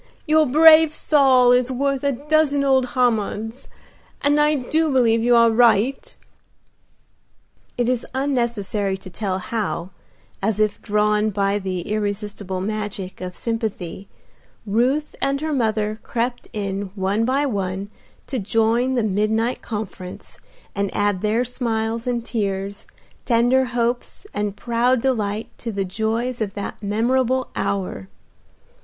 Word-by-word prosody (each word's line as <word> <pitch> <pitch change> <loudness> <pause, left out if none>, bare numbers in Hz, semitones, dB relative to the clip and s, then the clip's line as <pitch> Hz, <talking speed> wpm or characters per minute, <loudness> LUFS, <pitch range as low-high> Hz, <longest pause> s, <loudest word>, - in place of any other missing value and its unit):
Your 310 -1 +4
brave 315 +2 +7
Saul 260 -4 +4
is 250 +1 +3
worth 275 +1 -1
a 280 - +2
dozen 290 +1 +1
old 265 -2 +3
Hammonds, 225 -1 0 0.5
and 290 +1 +3
I 300 +1 +3
do 310 +4 0
believe 230 -4 +3
you 240 +1 +4
are 230 -1 +6
right." 240 - +2 1.6
It 240 -1 +1
is 250 -1 0
unnecessary 235 -7 -1
to 190 -1 -12
tell 190 -1 -2
how, 190 -2 -3 0.5
as 210 +1 0
if 215 -1 +1
drawn 210 0 +1
by 200 0 0
the 185 -2 -3
irresistible 205 -1 -3
magic 205 -2 -4
of 180 -1 -6
sympathy, 205 -5 -4 0.6
Ruth 250 +8 0
and 275 0 0
her 310 +1 -2
mother 215 -4 0
crept 245 +1 -3
in 200 -1 -3
one 195 +3 0
by 270 +4 +1
one 195 -4 -3 0.3
to 260 - -3
join 225 +5 +1
the 240 - +1
midnight 220 +4 0
conference 195 -4 -7 0.3
and 200 0 -1
add 205 -2 +1
their 220 +3 +1
smiles 230 -2 -2
and 240 -2 -1
tears, 200 -3 -3 0.4
tender 245 +2 +3
hopes 240 - -2
and 205 -1 -2
proud 240 +2 +1
delight 220 -4 -2
to 230 - -4
the 195 -2 -2
joys 225 +5 -2
of 205 -2 -2
that 200 +1 -6
memorable 250 +5 +1
hour. 195 - -2
225 Hz, 130 wpm, -22 LUFS, 205-255 Hz, 1.6 s, brave